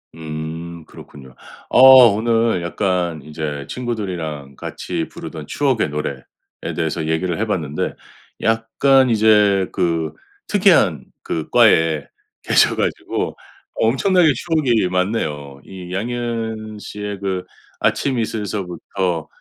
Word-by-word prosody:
음. 80 +1 -7
그렇군요. 65 -3 -14 0.3
어 - - +3 0.3
오늘 115 -2 +1
약간 85 -2 -1
이제 75 -2 -5
친구들이랑 90 - -4
같이 - - -4
부르던 80 -3 -8
추억의 135 - 0
노래에 75 +1 -4 0.5
대해서 80 0 -2
얘기를 80 +3 -1
해봤는데. 85 -9 -2 0.5
약간 120 +4 +3
이제 105 -4 +4
그 80 -3 -1 0.3
특이한 - - +3 0.2
그 80 -2 -4
과에 80 -3 +4 0.4
계셔 - - +4
가지고 - - -2 0.4
엄청나게 160 - +3
추억이 130 - +1
많네요. 75 -8 -2
이 90 -2 -9
양희은 110 0 -3
씨의 105 -1 -6
그 95 -2 -2 0.4
아침 130 -3 0
이슬서부터 95 -5 -3
95 Hz, 240 characters per minute, -20 LUFS, 80-115 Hz, 0.5 s, 이제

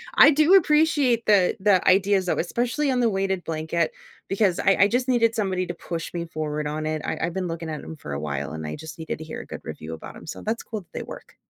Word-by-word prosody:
I - - +9
do 310 +4 +4
appreciate 300 - +4
the 195 -4 +4
the 190 -2 +3
ideas, 190 0 +3
though, - - +1
especially 245 - 0
on 250 - +1
the 235 -2 +3
weighted 195 -2 -1
blanket, 160 - -1 0.4
because 195 -2 +2
I 195 - +3
I 200 - +7
just 245 +3 0
needed 230 -2 +3
somebody 190 -4 -1
to 175 - -4
push 170 -1 -6
me 170 -1 -3
forward 150 -2 -3
on 155 +1 -3
it, 155 0 -2
I - - -2
I've 170 - -1
been 185 -2 -2
looking 165 -1 -5
at 155 - -5
'em 160 - -8
for 75 - -7
a 70 - -3
while, 70 0 -4
and 80 -1 -5
I 75 - -4
just 160 +1 -10
needed 160 - -4
to 160 - -8
hear 160 - -7
a - - -12
good - - -7
review 80 +1 -7
about - - -10
'em, - - -12
so - - -7
that's 225 +2 -2
cool 215 -3 -5
that - - -26
they - - -4
work. - - -11
185 Hz, 260 wpm, -24 LUFS, 160-230 Hz, 0.4 s, I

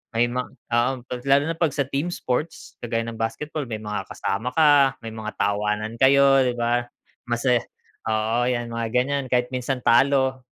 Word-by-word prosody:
May 120 +1 +3
ma 125 0 -1
oo. 120 +2 -1 0.2
'Pag 125 0 -6
lalo 140 +1 +4
na 165 - -2
'pag 165 -3 +1
sa 140 -2 -1
team 145 +6 -2
sports 150 0 -4
kagaya 115 -1 -1
ng 115 - -5
basketball 150 +7 -3
may 110 -1 -4
mga 105 -2 -4
kasama 110 +6 -2
ka, 145 -4 +5
may - - -6
mga 110 -1 -5
tawanan 105 +2 -1
kayo, 135 0 +5
'di 125 - +1
ba? 120 +1 +1 0.4
Masaya 120 0 +1 0.4
oo, 110 +2 +1
'yan 120 -1 -1
mga 115 0 -2
ganyan 135 +2 +1
kahit 125 0 +2
minsan 125 +1 -2
talo 130 +1 +3
125 Hz, 175 wpm, -23 LUFS, 115-135 Hz, 0.4 s, ka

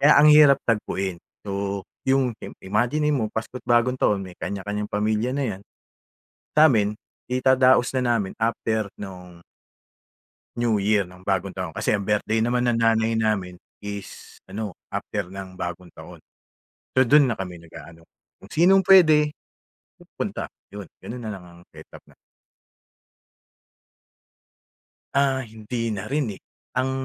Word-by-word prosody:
Kaya 145 +2 +7
ang 150 - +7
hirap 145 -3 +7
tagpuin. 95 -5 -1 0.3
So, 100 0 -3 0.2
yung 130 -3 +2
im - - -6
imaginin 125 +10 +1
mo 110 -6 -1
Pasko't 115 +3 -5
Bagong 120 +1 +3
taon 100 -2 +2
may 90 - -11
kanya 100 -1 -4
kanyang 105 0 -3
pamilya 110 +3 0
na 140 - -1
yan, 95 - -15 1.0
samin, 110 -10 +5 0.4
idadaos 130 0 +4
na 125 -2 +2
namin 105 -5 -1
after 110 -2 -1
'nong 90 -3 -10 1.2
New 120 -3 +1
Year 105 +1 +2
ng 90 0 -14
bagong 95 -1 0
taon, - - -6
kasi - - -1
ang 100 -2 0
birthday 105 +1 +1
naman 120 +2 +1
ng 115 - 0
nanay 115 0 +2
namin 100 -5 -1 0.2
is, 100 -1 -8
ano 100 +2 -5 0.2
after 105 -3 -4
ng 95 0 -9
bagong 85 0 -5
taon, - - -13 0.7
so 130 - +6
dun 145 +2 +5
na 115 - -1
kami 90 -3 -6
nag-aano 85 0 -14 0.3
kung - - -14
sinong 185 +4 +5
pwede. 155 -6 +7 0.7
Pupunta. - - -6 0.2
Yun, 105 - -6 0.2
ganun 120 0 -8
na 110 - -4
lang 95 -3 -8
ang 85 0 -16
setup - - -14
na - - -23 3.0
Ah, 135 -2 +1
hindi 110 +1 -4
narin 115 +2 -2
eh. - - -15 0.3
Ang 130 +1 0
110 Hz, 140 wpm, -24 LUFS, 100-125 Hz, 3.0 s, Kaya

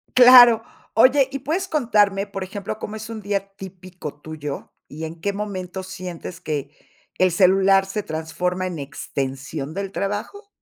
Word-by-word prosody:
Claro. 245 -2 +9 0.3
Oye, 265 +3 +5
¿y 275 - -4
puedes 330 +8 -2
contarme, 210 - +2
por 195 -2 -6
ejemplo, 200 +2 -6
cómo 210 - -6
es 220 +1 -7
un 220 - -6
día 200 -1 -2
típico 185 -5 -9
tuyo? 150 -2 -7 0.2
¿Y 155 +2 -8
en 160 +1 -9
qué 200 +3 0
momento 190 -2 -5
sientes 185 -1 -8
que 145 -4 -3 0.5
el 185 -1 +4
celular 195 +1 +4
se 200 +2 -3
transforma 180 +3 -3
en 175 -4 -4
extensión 140 +1 -5
del 195 0 -4
trabajo? 210 - -4
195 Hz, 155 wpm, -22 LUFS, 170-210 Hz, 0.5 s, Claro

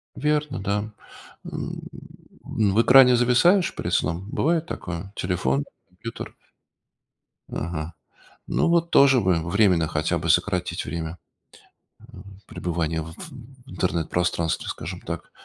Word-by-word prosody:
Верно, 150 -1 0
да. 105 +2 -2 0.5
М, - - -5 0.6
в 105 0 +2
экране 125 0 +7
зависаешь 125 +10 +3
перед - - -3
сном? 85 +6 -1
Бывает 165 +1 +1
такое? 90 - -6
Телефон, 70 -7 0 0.2
компьютер? 105 +6 -8 1.2
Ага. 80 0 -4 0.5
Ну - - +1
вот 170 0 +2
тоже 135 -3 +6
бы 95 -3 +2
временно 90 -2 +3
хотя 80 +3 0
бы 80 +1 -3
сократить 90 +2 +1
время, 85 0 -5 1.0
м, 100 0 -13
пребывания 85 -2 -2
в 80 +1 -8 0.5
в 135 - -14
интернет 85 -3 -1
пространстве, 85 -2 -1
скажем - - -6
так. - - -6
95 Hz, 115 wpm, -24 LUFS, 85-125 Hz, 1.2 s, экране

